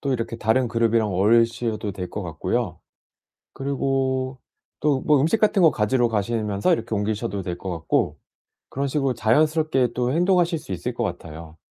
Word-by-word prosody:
또 140 -1 -1
이렇게 115 -1 -3
다른 115 +3 +1
그룹이랑 115 -2 +1
어울리셔도 115 +1 +1
될 90 0 -6
것 105 - -5
같고요. 80 -3 -2 0.8
그리고 135 -1 -1 0.4
또 145 -3 +1
뭐 150 -3 +4
음식 165 +9 +2
같은 210 -2 +3
거 165 - +7
가지러 120 +3 +1
가시면서 105 - 0
이렇게 115 - -2
옮기셔도 100 -1 -2
될 90 -1 -5
것 95 - -6
같고. 85 -2 -1 0.5
그런 140 +1 -2
식으로 135 -2 0
자연스럽게 150 +3 +2
또 125 +1 0
행동하실 175 0 +2
수 125 - -9
있을 90 - -4
것 - - -2
같아요. 80 +1 -7
120 Hz, 360 characters per minute, -23 LUFS, 105-140 Hz, 0.8 s, 거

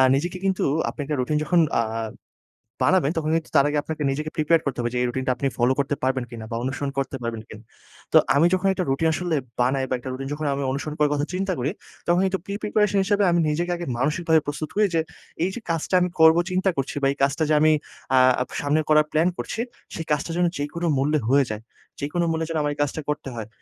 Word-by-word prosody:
নিজেকে 175 +6 -1
কিন্তু 190 -1 +1 0.3
আপনি - - -6
একটা 150 +1 -2
রুটিন 140 +4 0
যখন 175 +3 +2 0.2
আ - - +2 1.0
বানাবেন 180 -6 +3
তখন 155 -1 0
কিন্তু 165 -1 -2
তার 140 - +6
আগে 150 - 0
আপনাকে 155 -1 -4
নিজেকে 150 +3 -3
প্রিপেয়ার 160 0 +3
করতে 135 -3 -2
হবে 120 0 -1
যে - - -1
এই - - +2
রুটিন 130 +2 -3
টা 130 - +4
আপনি 135 +3 -1
ফলো 120 +2 +3
করতে 140 +1 0
পারবেন 130 -1 +1
কিনা 115 -2 -8
বা - - -2
অনুসরণ 135 +2 -2
করতে 135 +1 -1
পারবেন 115 -1 -3
কিনা? 110 0 -11 0.5
তো - - +9 0.2
আমি 145 +4 +5
যখন 185 +1 +2
একটা 190 - -1
রুটিন 135 +5 +1
আসলে 175 0 -1 0.2
বানাই 130 +2 +2
বা - - 0
একটা 130 - -7
রুটিন 135 +1 -5
যখন 155 +1 -4
আমি 140 0 -2
অনুসরণ 145 +3 -3
করার 150 -1 +3
কথা 145 0 0
চিন্তা 190 +1 -1
করি, 135 +5 0 0.4
তখন 175 +1 +3
কিন্তু 190 0 0
প্রি-প্রিপারেশন 205 0 0
হিসাবে 205 +1 +2
আমি 170 - +3
নিজেকে 170 +4 -1
আগে 175 0 -5
মানসিকভাবে 160 +3 +2
প্রস্তুত 150 +1 -3
করি 210 +1 +4
যে, 165 - +3 0.4
"এই 185 - +1
যে - - -4
কাজটা 165 +3 -1
আমি 180 - +1
করবো 160 +1 +7
চিন্তা 185 +1 +2
করছি 135 -1 -2
বা 135 - +3
এই 140 - -6
কাজটা 140 +3 +2
যে - - +4
আমি 155 0 +6 0.4
আ - - +5 0.4
সামনে 145 +2 +2
করার 155 0 +5
প্ল্যান 160 +3 +3
করছি 225 - -3 0.3
সেই 165 - -4
কাজটা 150 +3 0
যেন 180 - +3
যেকোনো 160 +4 -3
মূল্যে 150 +3 +2
হয়ে 140 +1 +4
যায়। 110 +1 -5 0.4
যেকোনো 160 +5 -1
মূল্যে 160 0 -1
যেন 165 - -1
আমার 145 0 0
এই 145 - -15
কাজটা 145 +2 -1
করতে 145 -2 -2
হয়। 110 -3 -5
150 Hz, 230 wpm, -24 LUFS, 135-170 Hz, 1.0 s, তো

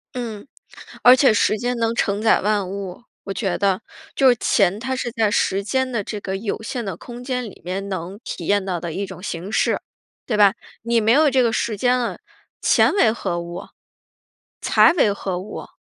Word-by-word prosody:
嗯。 230 -1 -5 0.6
而 250 +1 +9
且 260 -3 +4
时 215 0 +2
间 245 +3 -2
能 230 0 0
承 205 -2 0
载 220 - +4
万 205 -2 0
物， 195 +1 -6 0.2
我 195 - -4
觉 195 -3 -1
得。 195 -2 +1 0.3
就 270 -2 +5
是 245 - +4
钱 195 -2 +2
它 260 +3 -2
是 245 -2 -3
在 220 -3 +1
时 195 -1 +1
间 260 +4 -1
的 230 -4 -1
这 210 - -5
个 190 -1 -4
有 215 +1 -4
限 235 0 -4
的 195 - -4
空 245 0 -10
间 250 -1 -2
里 220 - -10
面 195 +2 -3
能 190 +1 -5
体 170 - -6
验 205 -1 +2
到 180 -3 -2
的 165 -1 -5
一 200 +4 -3
种 185 - -10
形 180 +1 -5
式， - - +1 0.4
对 215 -4 -1
吧？ 200 -2 +6 0.3
你 235 0 +2
没 220 +1 +3
有 295 +3 +5
这 260 -1 +3
个 230 - +2
时 220 0 -1
间 250 +4 +2
了， 240 -2 -3 0.4
钱 - - +4
为 235 - +4
何 175 -6 -3
物？ 170 +1 -7 1.0
财 - - +5
为 250 - +3
何 190 -2 -4
物？ 200 +3 -8
210 Hz, 220 characters per minute, -21 LUFS, 195-240 Hz, 1.0 s, 而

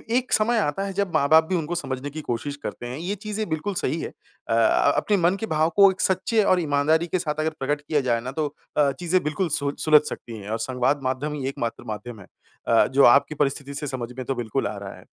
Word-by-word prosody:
एक 255 0 0
समय 230 +3 +3
आता 170 0 -1
है, 195 - -4
जब 195 -2 -2
माँ-बाप 155 +3 +5
भी 185 - +1
उनको 170 0 -2
समझने 135 -4 -4
की 155 +2 -7
कोशिश 140 +2 -3
करते - - -6
हैं, 125 +2 -5
ये 180 +6 -3
चीज़ें 210 +1 -4
बिल्कुल 160 +6 -2
सही 155 +5 -1
है। - - -3
अ - - -9
अ, 115 +5 +4
अपने 205 - +2
मन 175 +1 +2
के 225 - -2
भाव 155 -4 +1
को 200 -1 +8
एक 190 +2 -6
सच्चे 210 +3 +2
और 185 -2 +3
ईमानदारी 155 +1 +1
के 180 +2 -1
साथ 155 -3 -3
अगर 155 +1 +1
प्रकट 145 +2 -1
किया 145 0 0
जाए 120 -3 0
ना, 125 +2 -5
तो 150 +2 -1 0.3
अ, 145 -2 +4
चीज़ें 180 +1 +1
बिल्कुल 155 +4 -1
सोच 140 -1 -2
सुलझ 155 -1 +6
सकती 115 -1 -8
हैं, 100 -1 -9
और 110 +1 -2
संवाद 125 +4 0
माध्यम 130 +3 -2
ही 140 -3 -4
एकमात्र 120 -4 -4
माध्यम 110 +1 -6
है 95 - -14 0.4
अ, 115 - +5
जो 135 +2 +3
आपकी 140 +5 +5
परिस्थिति 140 -1 -1
से 145 +1 -4
समझ 125 -3 -4
में 130 - -5
तो 135 - -2
बिल्कुल 120 -3 -2
आ - - -5
रहा - - -7
है। - - -15
150 Hz, 250 wpm, -24 LUFS, 130-175 Hz, 0.4 s, को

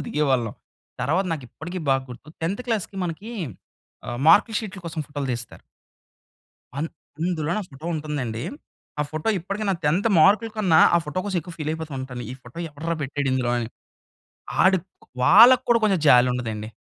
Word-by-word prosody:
ఫోటోలు - - -5
దిగేవాళ్ళం. 130 -7 0 0.5
తర్వాత 160 +10 +1
నాకిప్పటికి 160 +5 -6
బాగ 135 0 +3
గుర్తు 125 +5 -11
10థ్ 195 +9 -1
క్లాస్‌కి 210 -4 -2
మనకీ 180 +7 -5 0.7
ఆహ్, 120 - -4
మార్క్ 205 +7 +6
షీట్‌ల 200 -4 -7
కోసం 160 -1 -4
ఫోటోలు 145 -2 -4
తీస్తారు 120 -1 -7 1.2
అన్ 155 +3 -1 0.3
అందులో 165 -3 -1
నా - - 0
ఫోటో 145 +4 -10
ఉంటుందండీ! 140 -7 -3 0.6
ఆ - - +3
ఫోటో 155 +5 -3
ఇప్పటికి 200 +5 -4
నా 195 - +2
10థ్ 175 +9 +2
మార్క్‌ల 210 +7 +5
కన్నా 180 -7 +4 0.2
ఆ - - +5
ఫోటో 150 +5 -4
కోసం 190 -3 -1
ఎక్కువ 170 +1 -10
ఫీల్ 155 -1 -2
అయిపోతూ 160 -2 -6
ఉంటాను. 125 -2 -6
ఈ - - -6
ఫోటో 120 +7 -12
ఎవడ్రా 160 +3 -3
పెట్టాడిందులో 130 -3 -1
అని. 115 -2 -3 1.0
ఆడు 190 0 +5 0.3
క్ - - -20 0.2
వాళ్ళకి 240 - +8
కూడా 235 -1 +5
కొంచెం 195 -5 +3
జాలి 125 -2 +7
ఉండదండి. 110 -3 -4
155 Hz, 165 wpm, -24 LUFS, 130-190 Hz, 1.2 s, వాళ్ళకి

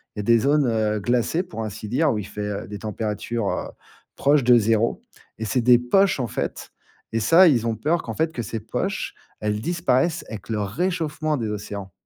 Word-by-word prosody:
Il - - -6
y - - 0
a - - -6
des 115 +2 +4
zones, 145 +4 +3
heu, 110 -2 +1
glacées 120 - 0
pour 170 -12 -6
ainsi 110 0 -6
dire 140 +6 +2
où 110 - -1
il 100 - -5
fait, 105 - -7
heu, 100 -1 -4
des 105 0 -7
températures, 110 +1 -3
heu, - - -3 0.5
proches 145 0 +3
de 120 0 +6
0 115 +1 +1 0.4
et 110 - -3
c'est 120 +4 +1
des 120 +1 +6
poches, 190 +9 +3
en 125 - -1
fait. - - -4 0.4
Et 115 - +1
ça, 165 - +7
ils 120 -7 +3
ont 115 - 0
peur 155 +10 0
qu'en - - -6
fait 160 0 0
que 120 - -3
ces 115 +1 -4
poches, 195 - -3 0.3
elles 105 0 -1
disparaissent, 170 0 0
avec 110 0 -8
le 110 -2 -1
réchauffement 155 - -1
des 115 -4 -2
océans. 100 -2 -6
115 Hz, 215 wpm, -23 LUFS, 105-150 Hz, 0.5 s, ça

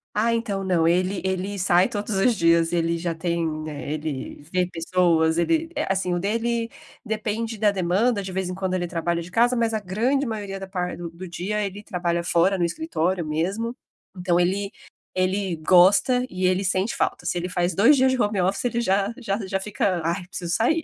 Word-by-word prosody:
Ah, 225 +2 +2
então, 215 -4 -1
não, 170 -3 +2
ele 185 +3 +1
ele 190 +2 -2
sai 180 -1 +3
todos 210 +2 -4
os 225 +4 +3
dias, 165 0 +3
ele 170 -1 0
já 170 -1 -2
tem, 160 -2 -2
eh, 150 0 -5
ele 150 -2 -5
vê 180 -1 +2
pessoas, 165 -1 +2
ele 325 - +1
eh, - - -1
assim, 185 -2 0
o 175 - 0
dele, 230 +3 -1 0.3
depende 220 0 -3
da 210 -1 +3
demanda, 200 +4 +1
de 190 -1 -6
vez 190 -1 -2
em 180 - -4
quando 190 0 -2
ele 175 -1 -1
trabalha 170 0 -2
de 180 - -12
casa, 240 +2 +3
mas 230 -1 +1
a 220 - 0
grande 230 +9 0
maioria 205 -5 -4
da 195 - -7
par 180 -2 -3
do 170 -1 -6
do 175 +2 -9
dia, 200 +4 -2
ele 200 +1 -6
trabalha 175 -4 -2
fora, 180 +2 +2
no - - +2
escritório 180 - -1
mesmo. 195 +10 -2 0.4
Então 180 -1 +1
ele 195 +3 0 0.4
ele 185 -1 0
gosta, 190 +10 +5
e 185 0 -2
ele 185 +2 +2
sente 190 +4 0
falta. - - -1
Se - - -1
ele 180 +1 -3
faz 175 -1 0
2 235 +9 +6
dias 260 0 +4
de 260 - -1
home 205 -2 +1
office, 195 +6 0
ele 235 -1 0
já 200 0 +1
já 210 -4 -2
já 195 0 -1
fica: 195 -3 -1
"Ai, 175 +2 -2
preciso 175 -2 -4
sair". 315 +9 +2
185 Hz, 205 wpm, -24 LUFS, 175-210 Hz, 0.4 s, 2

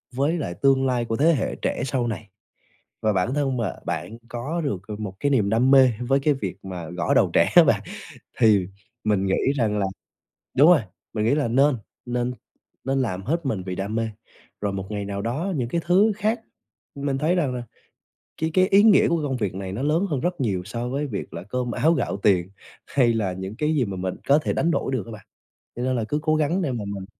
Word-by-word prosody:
với 145 +6 +1
lại 140 - -3
tương 135 +7 +3
lai 125 -2 0
của 115 0 -2
thế 160 +6 +4
hệ 135 - -1
trẻ - - -1
sau 125 -2 -1
này, 110 -2 -5 0.7
và 110 -1 +2
bản 95 +6 0
thân 135 -3 0
mà 110 -6 -1
bạn 115 - -4
có 145 +8 -3
được, 105 - -2
ờ, 105 - -5
một 100 -3 -5
cái 145 - +1
niềm 110 -7 +2
đam 120 +5 +3
mê 135 -2 +7 0.2
với 135 0 +4
cái 145 +2 +2
việc 95 -9 -5
mà 90 -4 -6
gõ 90 -1 -1
đầu - - +4
trẻ - - +4
á - - +10
bạn, - - +2 0.6
thì 105 -5 +5 0.4
mình 105 -2 +1
nghĩ 95 +8 +1
rằng 110 -5 +1
là 100 - +1 0.7
đúng 145 +6 +7
rồi, 170 -8 +5 0.3
mình 105 -1 0
nghĩ 115 +5 +3
là 145 -5 0
nên 135 +4 +3 0.3
nên 120 0 -1 0.5
nên 135 0 +1
làm 95 -6 -3
hết 165 - -2
mình 110 -8 -1
vì 90 - -3
đam 100 +3 -3
mê, 115 0 0 0.5
rồi 100 -1 -1
một 95 -1 -4
ngày 105 -1 -3
nào 100 0 -4
đó 150 - -2
những 125 -4 -1
cái 170 +7 -1
thứ 195 +5 +4
khác, 215 +3 0 0.5
mình 140 -1 -2
thấy 155 +5 +2
rằng 150 -8 0
là 125 - -4 0.8
cái 160 0 0
cái 185 +1 +4
ý 200 +1 +5
nghĩa 215 -3 +6
của 170 - +2
cái 155 - -3
công 130 - -2
việc 100 -6 -2
này 95 -1 -5
nó 105 +7 -4
lớn 160 +7 +2
hơn 140 -4 -1
rất 175 -1 -2
nhiều 100 -7 0
so 115 +4 -4
với 140 +3 -2
việc 105 -7 -5
là 85 - -6
cơm 125 +4 -3
áo 160 +7 +3
gạo 140 - -1
tiền, 95 -3 +3 0.4
hay 125 -4 +3
là 100 -5 -1
những 95 +3 -6
cái 150 +4 0
gì 135 -5 +2
mà 100 -2 -5
mình 90 0 -3
có 140 +2 +5
thể - - -2
đánh 170 - +1
đổi 135 - -1
được 120 -8 -1
á - - -9
bạn. 110 -2 -10 0.5
Cho 120 - -4
nên 130 0 0
là 115 - 0
cứ 150 - 0
cố 155 -1 +2
gắng 155 +5 +1
để 155 -7 -1
mà 120 -4 -3
mình 100 -2 -5
125 Hz, 240 wpm, -24 LUFS, 105-145 Hz, 0.8 s, á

